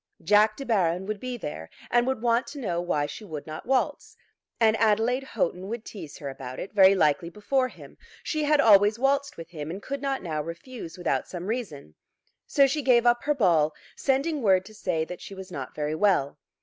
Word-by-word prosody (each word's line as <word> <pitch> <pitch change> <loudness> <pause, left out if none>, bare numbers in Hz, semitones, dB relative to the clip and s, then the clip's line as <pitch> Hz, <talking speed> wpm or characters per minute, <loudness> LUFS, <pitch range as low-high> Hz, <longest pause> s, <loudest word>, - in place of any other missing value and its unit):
Jack 215 +1 +4
De 275 - -6
Baron 185 -6 +1
would 210 0 -4
be 250 +1 -5
there, 115 - -7 0.2
and 240 +1 +3
would 265 -3 -1
want 235 0 +2
to 290 - -8
know 175 -9 -2
why 150 -4 0
she 145 +9 -8
would 155 -7 -7
not 155 +6 -8
waltz. 290 - -1 0.4
And 220 -1 +4
Adelaide 225 +4 +2
Houghton 190 -7 -2
would 230 +1 -5
tease 170 -9 -9
her 145 - -7
about 130 -1 -7
it, 195 - -7
very 195 -1 +7
likely 170 -1 +2
before 255 +8 0
him. - - -14 0.2
She 310 -1 -1
had 300 0 +3
always 210 -3 +6
waltzed 280 +2 0
with 165 0 -9
him, 150 -3 -6
and 180 +4 -5
could 275 +6 -5
not 275 -1 -2
now 155 -4 -2
refuse 170 - -8
without 160 -7 -1
some 175 -1 -6
reason. 195 - -5 0.5
So 280 - +5
she 275 +3 0
gave 245 -3 +4
up 240 0 +4
her 295 0 +2
ball, 165 - +3 0.2
sending 280 +3 0
word 190 -4 +3
to 215 - -13
say 175 -6 -1
that 180 +1 -8
she 195 - -9
was 190 -1 -9
not 135 -6 -6
very 150 0 -2
well. 155 -5 +1
205 Hz, 210 wpm, -26 LUFS, 165-250 Hz, 0.5 s, very